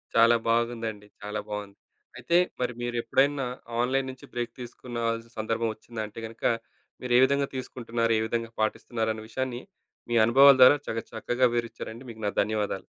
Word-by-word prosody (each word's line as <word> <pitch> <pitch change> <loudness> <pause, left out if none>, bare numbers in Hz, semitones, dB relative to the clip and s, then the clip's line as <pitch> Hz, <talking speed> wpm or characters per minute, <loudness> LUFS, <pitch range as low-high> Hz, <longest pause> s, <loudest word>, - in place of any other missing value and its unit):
చాలా 115 +1 +6
బాగుందండి, 115 -3 -1
చాలా 105 +1 -4
బావుంది. 105 -1 -6 0.4
అయితే 170 +1 +2 0.2
మరి 125 -1 0
మీరెప్పుడైనా 135 +3 +1 0.3
ఆన్‌లైన్ 130 +2 +1
నుంచి 130 - -13
బ్రేక్ 120 -1 -3
తీసుకున్నవాల్సిన 115 -1 -4
సందర్భం 115 +1 -1
ఒచ్చిందా 110 +1 -8
అంటే 105 - -10
గనక, 110 +1 -11 0.6
మీరే 125 -1 +2
విధంగా 140 +1 +1
తీసుకుంటున్నారు? 115 -3 -1
ఏ - - 0
విధంగా 115 0 -2
పాటిస్తున్నారు? 110 +1 -1
అనే 110 - -8
విషయాన్ని 130 +1 -3 0.5
మీ 120 - 0
అనుభవాల 135 +4 +8
ద్వారా 130 +3 +9
చాకా 115 0 -2
చక్కగా 120 +3 +1
వివరిచ్చారండి. 115 +1 -5
మీకు 110 - -12
నా - - 0
ధన్యవాదాలు. 105 -2 -2
115 Hz, 150 wpm, -27 LUFS, 110-125 Hz, 0.6 s, ద్వారా